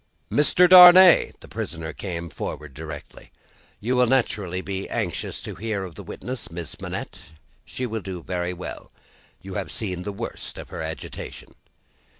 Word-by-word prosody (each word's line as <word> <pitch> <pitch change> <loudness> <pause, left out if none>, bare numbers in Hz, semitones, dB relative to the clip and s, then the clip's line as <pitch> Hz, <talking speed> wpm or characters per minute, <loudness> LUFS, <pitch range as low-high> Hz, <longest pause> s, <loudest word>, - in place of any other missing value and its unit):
"Mr. 175 +5 +5
Darnay!" 180 0 +9
The - - -12
prisoner 80 -1 -5
came 85 -4 -5
forward 75 -2 -6
directly. 75 0 -9 0.5
"You 125 +5 -1
will 125 0 +4
naturally 105 -8 0
be 95 0 -5
anxious - - -3
to - - -6
hear 105 +1 -3
of 90 -3 -8
the - - -9
witness, 125 0 -6
Miss 85 -1 -7
Manette. - - -6 0.4
She 130 - -4
will 110 -2 -3
do 90 -3 -7
very 90 -1 -2
well. 90 0 -8 0.5
You 95 0 -8
have - - -4
seen 95 -5 -3
the 105 - -4
worst 115 +4 -6
of - - -9
her - - -6
agitation." 80 0 -7
95 Hz, 155 wpm, -24 LUFS, 85-120 Hz, 0.5 s, Darnay